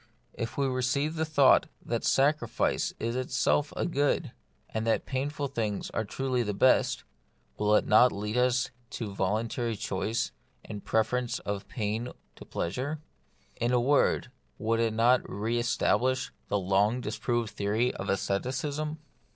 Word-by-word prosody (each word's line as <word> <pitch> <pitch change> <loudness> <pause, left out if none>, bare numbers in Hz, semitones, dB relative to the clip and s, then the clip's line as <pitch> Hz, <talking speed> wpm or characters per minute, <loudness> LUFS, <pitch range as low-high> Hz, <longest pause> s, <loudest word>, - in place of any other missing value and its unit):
If 115 -1 -5
we 140 - +2
receive 130 +4 0
the 160 -1 -1
thought 155 0 +5 0.2
that 115 -1 -2
sacrifice 145 +3 +2
is 115 +1 -2
itself 130 +3 +1
a - - 0
good, 145 -4 0 0.4
and 110 0 -3
that 115 - +1
painful 140 +2 -2
things 110 -6 -3 0.2
truly 130 +3 -1
are - - -1
the 105 -1 -2
best, 130 - +3 0.5
will 105 0 +3
it - - +3
not 125 +4 +6
lead 105 +2 -4
us 125 +1 +2 0.3
to 105 -4 -4
voluntary 110 +4 -1
choice 100 +3 -2 0.3
and 105 -2 -7
preference 120 +2 0
of 100 -1 -4
pain 110 +2 -3 0.2
to - - -12
pleasure? 130 - -3 0.6
In 120 +1 0
a 125 - +4
word, 130 0 +2 0.3
would 115 +1 0
it 115 -1 +1
not 120 +3 +4
re 110 +4 -1
establish 130 +2 +1 0.2
the 105 - +1
long 100 +5 +2
disproved 120 -2 -2
theory 110 +5 0
of - - -5
asceticism 135 +10 -1
120 Hz, 145 wpm, -29 LUFS, 110-130 Hz, 0.6 s, not